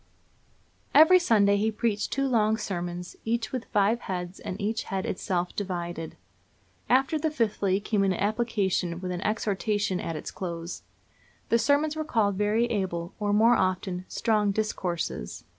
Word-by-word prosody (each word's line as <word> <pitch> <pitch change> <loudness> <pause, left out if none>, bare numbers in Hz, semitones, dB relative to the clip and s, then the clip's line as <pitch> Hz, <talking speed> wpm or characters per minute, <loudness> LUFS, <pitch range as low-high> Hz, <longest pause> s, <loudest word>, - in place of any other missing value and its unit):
Every 345 +4 +8
Sunday 205 - +4
he 220 +2 +1
preached 215 -1 -1
two 275 0 0
long 220 -3 +2
sermons, 175 -4 -4
each 230 0 -1
with 255 -3 -3
five 210 +3 +2
heads, 180 -3 -5
and 185 - -6
each 220 +2 -2
head 190 -1 -3
itself 180 -1 -2
divided. 175 -4 -4 0.7
After 270 +5 +3
the 315 +1 +1
fifthly 205 -8 0
came 205 -1 0
an 195 - +2
application, 200 -5 0
with 180 0 -4
an 180 0 -3
exhortation 205 -2 0
at 165 - -4
its - - -6
close. 170 -2 -5 0.7
The 230 - +4
sermons 290 +5 +2
were 310 - -2
called 220 -9 +1
very 210 +4 +2
able, 190 -6 -2
or, 205 -1 0
more 225 +4 +5
often, 185 -1 -1
"strong 215 -3 +1
discourses." 180 - -3
205 Hz, 150 wpm, -27 LUFS, 185-230 Hz, 0.7 s, Every